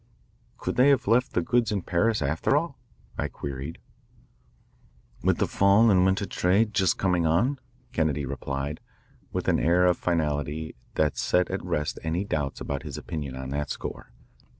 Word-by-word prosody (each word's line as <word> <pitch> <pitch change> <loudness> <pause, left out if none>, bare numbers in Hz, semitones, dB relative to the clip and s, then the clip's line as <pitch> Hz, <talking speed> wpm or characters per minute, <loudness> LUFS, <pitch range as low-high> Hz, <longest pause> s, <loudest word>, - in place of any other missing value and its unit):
"Could - - -3
they 130 +3 +6
have 140 -3 +3
left 125 +4 +3
the 90 - +1
goods 120 +4 +1
in 100 -4 -1
Paris, 105 +1 +1
after 80 - +1
all?" 165 -2 -2 0.4
I - - 0
queried. 70 +3 -6 1.4
"With - - +2
the - - +2
fall 100 +3 +4
and 90 -2 +5
winter 95 +1 +2
trade 100 +4 +1
just 95 -2 +2
coming 90 -3 +1
on?" 120 - +2 0.3
Kennedy 75 -3 0
replied, 70 +2 -4 0.5
with - - -3
an - - +3
air 90 +3 +3
of 90 -1 +3
finality 80 -2 -1 0.2
that 75 -2 +1
set 90 0 +1
at - - -3
rest 75 0 -2
any 80 +4 -1
doubts 75 -7 -2
about 70 -2 -3
his - - -7
opinion 70 -5 -5
on 65 0 -6
that 75 +1 -2
score. - - -6
85 Hz, 165 wpm, -26 LUFS, 75-100 Hz, 1.4 s, they